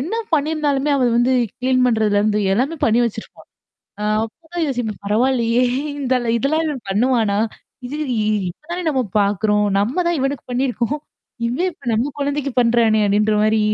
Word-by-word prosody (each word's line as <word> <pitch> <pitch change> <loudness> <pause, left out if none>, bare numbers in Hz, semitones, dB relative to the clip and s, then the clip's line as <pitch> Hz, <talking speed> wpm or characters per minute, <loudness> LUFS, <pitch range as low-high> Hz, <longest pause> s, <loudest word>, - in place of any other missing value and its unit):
என்ன 335 +12 -3 0.2
பண்ணியிருந்தாலுமே 295 -2 +1
அவ 260 - +2
வந்து 245 +2 +3 0.3
கிளீன் 255 0 +2
பண்றதுலருந்து 210 -2 +2
எல்லாமே 265 +11 0
பண்ணி 230 +1 +3
வச்சிருப்பா! 220 -2 -6 0.6
ஆ - - -2 0.2
அப்பதான் 325 +8 -5
யோசிப்பேன். 240 -6 -3
பரவாயில்லயே! 235 +2 +2 0.4
இந்த 260 -2 0 0.2
இதெல்லாம் 310 +7 0
இவன் 280 -8 -5
பண்ணுவானா! 220 -1 +2 0.5
இது 285 +4 -5 0.2
இ - - 0 0.3
இப்ப 175 - -16
தானே 360 +1 -3
நம்ம 265 -3 +1 0.2
பார்க்குறோம். 210 +1 +1
நம்ம 210 +6 0
தான் 345 - +1
இவனுக்கு 270 0 -2
பண்ணியிருக்கோம் 250 +2 -1 0.5
இவன் 305 +11 0
இப்ப 330 - -22
நம்ம 240 +6 0
குழந்தைக்கு 285 -1 -1
பண்றானே! 230 -2 +3
அப்பிடின்ற 210 +1 +2
மாரி 215 0 +2
245 Hz, 150 wpm, -20 LUFS, 220-280 Hz, 0.6 s, வந்து